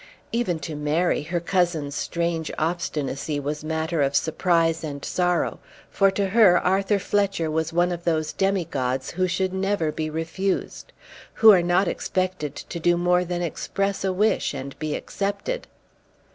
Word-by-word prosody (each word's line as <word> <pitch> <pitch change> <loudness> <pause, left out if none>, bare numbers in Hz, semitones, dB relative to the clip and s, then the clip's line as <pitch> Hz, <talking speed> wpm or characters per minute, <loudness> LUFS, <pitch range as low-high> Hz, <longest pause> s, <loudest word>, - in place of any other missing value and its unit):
Even 230 -8 0
to 155 +1 -6
Mary 150 +4 +1
her 170 +4 -2
cousin's 170 -5 0
strange 170 +1 -2
obstinacy 155 -3 -2
was 150 +1 -4
matter 160 0 -1
of 140 0 +1
surprise 165 +1 +2
and 140 -2 -5
sorrow, 180 -1 0 0.3
for 195 -1 +4
to 195 0 -1
her 195 -4 +6
Arthur 195 +2 +2
Fletcher 195 -5 0
was 160 +1 -1
one 175 +2 +2
of 175 -1 -4
those 155 -2 0
demigods, 140 -10 -1
who 185 +1 0
should 185 +1 -1
never 190 -4 0
be 155 0 -3
refused, 165 +5 -3 0.4
who 220 -1 +8
are 185 -4 +6
not 175 +2 +2
expected 185 -7 -2
to 170 - -7
do 175 +1 +3
more 180 +1 +3
than 175 0 -3
express 195 +4 -2
a 190 - +1
wish 200 -5 +1
and 135 0 -7
be 155 -1 -2
accepted. 205 - -3
175 Hz, 155 wpm, -24 LUFS, 155-190 Hz, 0.4 s, who